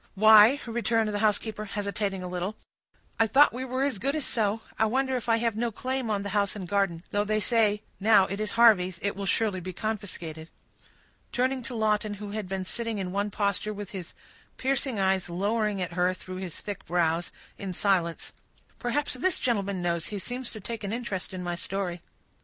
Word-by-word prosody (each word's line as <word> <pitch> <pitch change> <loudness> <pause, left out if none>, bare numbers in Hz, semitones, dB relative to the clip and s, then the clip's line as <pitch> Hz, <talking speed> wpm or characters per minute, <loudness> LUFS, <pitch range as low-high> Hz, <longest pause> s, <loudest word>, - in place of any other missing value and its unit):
"Why," 220 +5 +8
returned 230 -1 +1
the 205 - -1
housekeeper, 215 0 0
hesitating 200 -2 -2
a - - -4
little, 180 +3 -3 0.6
"I 225 - +5
thought 275 +4 +6
we 255 +2 -4
were 260 +1 -1
as 275 -8 0
good 275 +7 0
as 305 - -1
so. 220 -1 0 0.2
I 220 - +4
wonder 265 +3 +1
if 245 -1 -3
I 230 - +5
have 230 -2 0
no 235 +1 -1
claim 255 +2 -3
on 205 -2 0
the 200 - -4
house 200 -1 +1
and 190 -4 -6
garden; 195 -4 0
though 205 0 +2
they 215 +1 0
say, 215 -2 +2 0.2
now 205 -1 +6
it 195 +2 -4
is 215 0 -2
Harvey's, 205 -7 +5
it 200 - 0
will 200 0 -4
surely 210 -4 +1
be 185 +1 -6
confiscated." 175 -7 -4 0.8
Turning 255 +1 0
to 245 +1 -5
Lawton, 215 -1 +1
who 205 0 -7
had 210 -3 -4
been 190 -1 -2
sitting 230 +2 -2
in 185 -2 -3
one 200 +2 0
posture, 200 +1 -1
with 205 -1 -7
his 185 -4 -7 0.4
piercing 265 -3 0
eyes 190 -1 +1
lowering 205 +3 0
at 175 -1 -5
her 180 +1 +2
through 185 0 -8
his 185 -3 -6
thick 205 -2 -6
brows, 170 -1 +1 0.3
in 195 -1 -4
silence, 180 -3 0 0.5
"Perhaps 265 +4 -1
this 320 +8 +1
gentleman 200 -6 0
knows—he 170 +3 -1
seems 245 +5 -4
to 220 - -7
take 225 +2 -6
an 200 - -3
interest 230 -5 -3
in 185 -1 -5
my 175 0 -2
story." 180 -1 -3
205 Hz, 200 wpm, -28 LUFS, 190-230 Hz, 0.8 s, Why